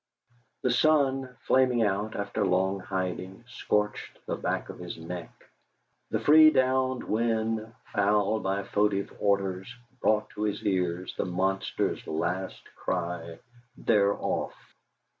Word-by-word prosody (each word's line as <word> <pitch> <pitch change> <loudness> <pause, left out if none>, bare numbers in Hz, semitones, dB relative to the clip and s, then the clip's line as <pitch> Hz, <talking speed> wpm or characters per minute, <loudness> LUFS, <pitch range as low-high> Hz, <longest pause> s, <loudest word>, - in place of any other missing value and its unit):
The 125 - +2
sun, 135 -1 +3 0.2
flaming 125 -3 +3
out 105 +1 -1
after 100 +1 -2
long 95 +1 +1
hiding, 95 +2 -4
scorched 105 -4 -2
the - - -2
back - - -2
of - - -8
his 90 -1 -6
neck; 85 +1 -6 0.8
the - - 0
free 155 +1 +8
down 130 -2 +1
wind, 110 0 0 0.2
fouled 105 +1 +2
by 95 +1 -1
foetid 100 0 0
odours, 100 0 0 0.3
brought 105 0 +2
to 105 - -7
his 105 -1 -1
ears 90 -2 0
the - - 0
monster's 95 +2 -1
last 90 +4 -2
cry, 85 -2 -3 0.4
"They're 100 -2 +3
off!" - - -2
100 Hz, 120 wpm, -28 LUFS, 95-115 Hz, 0.8 s, free